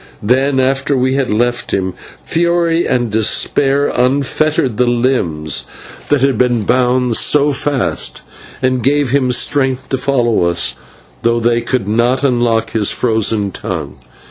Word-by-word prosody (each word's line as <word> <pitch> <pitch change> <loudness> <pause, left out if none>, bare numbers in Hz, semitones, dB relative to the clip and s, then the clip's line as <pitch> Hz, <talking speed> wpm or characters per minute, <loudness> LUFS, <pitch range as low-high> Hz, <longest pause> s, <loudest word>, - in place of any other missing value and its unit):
Then, 130 +5 +1
after 135 +1 +1
we 130 +1 +1
had 135 -2 -1
left 120 +2 -1
him, 95 -1 -2 0.3
fury 170 0 +1
and 120 -3 0
despair 135 +6 +1
unfettered 135 0 0
the 125 - +2
limbs 85 - 0 0.4
that 145 -3 +2
had 135 -5 +1
been 120 -3 +1
bound 125 +1 +1
so 145 0 +3
fast 135 -1 -2 0.4
and 130 -1 +1
gave 140 0 +1
him 130 -2 +1
strength 130 +1 0
to 135 - -1
follow 120 -8 +1
us, 85 -8 0 0.5
though 115 0 +1
they 120 0 +1
could 120 -3 -2
not 120 +5 +1
unlock 120 -4 +1
his 105 -3 +1
frozen 110 -3 0
tongue. - - -6
125 Hz, 140 wpm, -15 LUFS, 115-135 Hz, 0.5 s, so